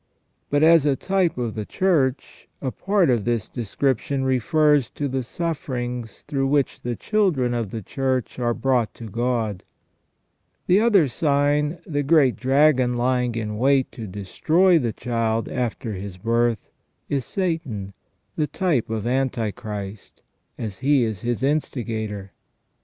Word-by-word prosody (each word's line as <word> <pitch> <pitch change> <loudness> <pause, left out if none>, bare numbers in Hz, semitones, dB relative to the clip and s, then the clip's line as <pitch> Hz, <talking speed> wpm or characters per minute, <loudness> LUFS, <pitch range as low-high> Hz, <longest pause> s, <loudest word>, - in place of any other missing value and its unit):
But, 145 +1 +2
as 160 -2 +6
a 140 - +3
type 190 0 0
of 120 -3 -2
the 110 - -4
Church, 140 - 0
a 130 - -3
part 195 -4 +2
of 115 -4 +1
this 120 -2 -1
description 130 +3 -1
refers 145 +1 +3
to 145 - -3
the 130 0 -1
suffer 150 +1 -4
ings 120 -2 -5
through 135 -2 -1
which 140 -1 +1
the 120 -1 -3
children 165 - +1
of 115 -4 -2
the 110 +1 -6
Church 130 +2 -2
are 120 -1 0
brought 125 -4 0
to 115 - -8
God. 115 -3 -1 1.0
The 185 +3 +4
other 210 -9 +4
sign, 145 +3 +1
the 145 -3 -1
great 140 -3 +4
dragon 130 -2 +3
lying 125 -1 +1
in 105 -2 -3
wait 135 +1 +3
to 115 -3 -7
destroy 160 - +2
the 120 -5 -1
Child 115 -1 -1
after 120 -3 -3
His 95 -1 -7
birth 115 +2 0 0.4
is 140 -3 -1
Satan, 150 - -3 0.4
the 150 - 0
type 150 - 0
of 110 -1 -3
Antichrist, 110 -5 -3 0.3
as 105 -5 -5
he 140 -1 +3
is 110 -5 -3
his 120 +1 -2
instigator. 110 -8 -2
125 Hz, 145 wpm, -23 LUFS, 115-145 Hz, 1.0 s, as